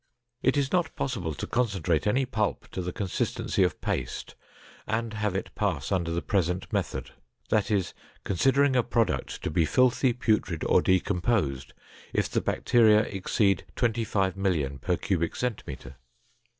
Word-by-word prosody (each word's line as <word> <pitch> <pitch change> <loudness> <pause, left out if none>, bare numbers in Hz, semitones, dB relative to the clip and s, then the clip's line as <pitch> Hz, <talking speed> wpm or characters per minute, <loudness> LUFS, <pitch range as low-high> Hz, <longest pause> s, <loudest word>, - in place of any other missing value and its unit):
It 130 +3 +2
is 140 -1 +1
not 175 -2 0
possible 95 - -2
to - - -4
concentrate 95 -9 0
any 130 +5 +2
pulp 110 -4 -2
to 95 - -3
the 90 0 -3
consistency 95 -1 -1
of - - +2
paste - - -3 0.5
and 110 0 -1
have 105 -3 -1
it 95 - -4
pass 90 -9 -1
under 90 -3 0
the 85 +1 -2
present 90 -2 -1
method; - - -2 0.4
that 105 -2 +2
is, 100 -4 0 0.3
considering 135 +8 +3
a 125 - +5
product 115 -1 -1
to - - -2
be 85 +1 +3
filthy, 125 - +3
putrid 110 -8 0
or - - +4
decomposed 90 - 0 0.4
if - - +1
the - - -1
bacteria 110 -3 +4
exceed 100 -2 0
25,000,000 95 - 0
per 90 +3 0
cubic 85 -4 -1
centimeter. 70 - -5
100 Hz, 145 wpm, -27 LUFS, 90-115 Hz, 0.5 s, a